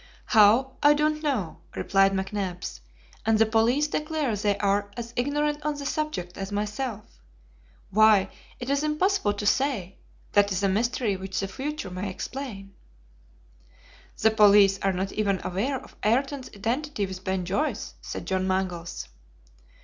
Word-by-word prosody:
"How, 235 +5 +5
I 295 0 +6
don't 305 +1 +1
know," 260 - -2 0.2
replied 195 0 +3
McNabbs; 190 - -3 0.4
"and 220 0 +3
the 225 - +5
police 230 +7 +2
declare 300 -5 -1
they 205 0 0
are 200 0 +1
as 235 0 -6
ignorant 295 +3 0
on 300 0 -1
the 285 - -6
subject 275 - -3
as 195 +1 -4
myself. 210 - -4 0.7
Why, 210 -1 +5 0.3
it 250 +2 -3
is 280 0 +2
impossible 305 - +1
to 205 0 -5
say; 210 -6 0 0.3
that 205 0 +4
is 190 +1 -1
a - - +4
mystery 225 +1 0
which 190 0 -4
the 195 - -1
future 275 -2 -5
may 185 +2 -4
explain." 195 -2 -6 1.5
"The 220 - +4
police 205 -2 +6
are 195 - +1
not 190 +1 -2
even 200 -3 0
aware 245 +9 -1
of - - -16
Ayrton's 265 +4 0
identity 235 +2 -2
with 190 -1 -8
Ben 190 -1 -1
Joyce," 200 - -2
said - - -6
John 190 0 0
Mangles. 185 -3 -2
210 Hz, 150 wpm, -26 LUFS, 195-270 Hz, 1.5 s, I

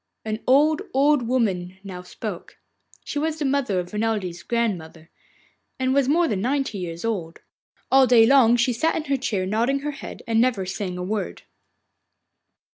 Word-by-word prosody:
An 215 0 -3
old, 295 +4 +4
old 275 -3 +3
woman 190 -7 -1
now 185 -2 -7
spoke: 180 +1 -8 0.5
she 290 - -3
was 315 +1 -1
the 300 - -2
mother 265 -9 +1
of 180 +2 -6
Renelde's 210 -5 -2
grandmother, 180 -9 -3 0.7
and 260 0 0
was 275 -1 +2
more 335 +3 +3
than 200 -8 -1
ninety 265 -3 -1
years 170 +1 -5
old. 180 -8 -3 0.5
All 265 -1 +6
day 235 -3 +6
long 240 -2 +5
she 250 +1 +2
sat 320 +8 0
in 315 - -2
her 280 -2 0
chair 205 -7 -2
nodding 235 +8 0
her 295 +1 -3
head 275 - -9
and 225 -1 +2
never 235 -6 +1
saying 185 -1 -4
a 180 - -4
word. 205 +2 -4
230 Hz, 170 wpm, -23 LUFS, 190-270 Hz, 0.7 s, All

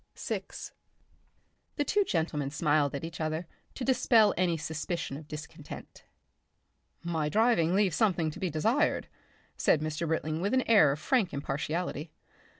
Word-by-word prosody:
Section - - -3
6 - - -8 1.0
The 290 - +1
two 410 +8 +2
gentlemen 160 - -1
smiled 145 -1 +1
at 140 - -5
each 165 0 -6
other 155 +2 -2 0.3
to 255 - -4
dispel 235 -5 +4
any 175 -1 +1
suspicion 160 -1 -4
of 150 +1 -9
discontent. 155 0 -9 1.0
"My 160 -3 -1
driving 205 -5 +3
leaves 195 -5 +2
something 175 -7 +2
to - - -10
be 185 - -1
desired," 225 - +1 0.5
said 155 - +3
Mr. 155 +2 -2
Britling 160 0 -1
with 200 +7 +1
an 260 - +3
air 200 -11 +6
of 145 - -3
frank 215 - +1
impartiality. 150 +3 -3
165 Hz, 150 wpm, -30 LUFS, 155-200 Hz, 1.0 s, air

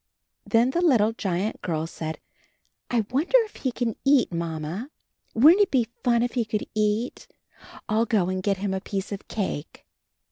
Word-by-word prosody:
Then 235 +2 +3
the 345 - 0
little 230 -10 +4
giant 195 -1 -2
girl 160 -2 -2
said, 160 -1 -6 0.7
"I 230 -3 +1
wonder 310 - +3
if 430 - -12
he 260 - -1
can 235 -2 -2
eat. 275 -8 +3
Mamma. 170 - -4 0.5
Wouldn't 315 - +7
it 400 - +4
be 245 - +1
fun 240 -2 +3
if 245 - -2
he 245 - +1
can 215 -1 -2
eat? 215 +3 -1 0.6
I'll 220 +2 +1
go 205 -6 +2
and 185 0 -2
get 195 0 0
him 195 0 -2
a 190 - -2
piece 195 0 -4
of 200 0 -6
cake." 190 -8 -4
215 Hz, 175 wpm, -25 LUFS, 190-245 Hz, 0.7 s, Wouldn't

